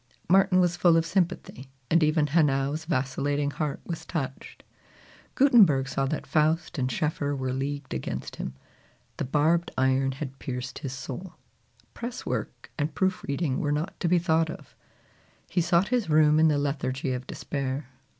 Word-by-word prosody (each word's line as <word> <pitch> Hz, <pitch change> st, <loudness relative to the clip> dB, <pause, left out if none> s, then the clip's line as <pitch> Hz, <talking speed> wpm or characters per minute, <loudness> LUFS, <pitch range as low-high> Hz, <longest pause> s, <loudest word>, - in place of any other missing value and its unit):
Martin 190 Hz, +1 st, +5 dB
was 175 Hz, -1 st, +2 dB
full 175 Hz, -2 st, +4 dB
of 165 Hz, -, +2 dB
sympathy, 170 Hz, -7 st, -2 dB, 0.2 s
and 170 Hz, +1 st, +5 dB
even 155 Hz, 0 st, +3 dB
Hanau's 145 Hz, 0 st, +1 dB
vacillating 145 Hz, -1 st, 0 dB
heart 150 Hz, -1 st, -3 dB
was 170 Hz, -2 st, -5 dB
touched. 135 Hz, -6 st, -5 dB, 0.7 s
Gutenberg 200 Hz, -, +5 dB
saw 135 Hz, 0 st, -1 dB
that 155 Hz, -, -3 dB
Faust 155 Hz, 0 st, +1 dB
and 130 Hz, 0 st, 0 dB
Schoeffer 145 Hz, +2 st, -1 dB
were 130 Hz, -1 st, -2 dB
leagued 140 Hz, +1 st, -3 dB
against 65 Hz, 0 st, -5 dB
him. 65 Hz, -, -5 dB, 0.6 s
The -, -, -2 dB
barbed 160 Hz, +5 st, +2 dB
iron 130 Hz, +1 st, +2 dB
had 135 Hz, -1 st, -7 dB
pierced 130 Hz, -1 st, -5 dB
his 135 Hz, -4 st, -5 dB
roul. 175 Hz, +7 st, -7 dB, 0.6 s
Press 240 Hz, +1 st, -6 dB
work -, -, -4 dB
and 145 Hz, +1 st, -1 dB
proof 185 Hz, 0 st, 0 dB
reading 140 Hz, -1 st, -1 dB
were 145 Hz, -, 0 dB
not 150 Hz, +5 st, -2 dB
to 175 Hz, -, 0 dB
be 180 Hz, +1 st, +4 dB
thought 165 Hz, -2 st, +2 dB
of. -, -, -10 dB, 0.7 s
He 180 Hz, -, +1 dB
sought 175 Hz, +2 st, +2 dB
his 240 Hz, -8 st, 0 dB
room 155 Hz, 0 st, +5 dB
in 160 Hz, -, +6 dB
the 150 Hz, -2 st, +3 dB
lethargy 135 Hz, -2 st, -1 dB
of 125 Hz, +1 st, -5 dB
despair. 135 Hz, -1 st, -4 dB
150 Hz, 160 wpm, -27 LUFS, 135-170 Hz, 0.7 s, in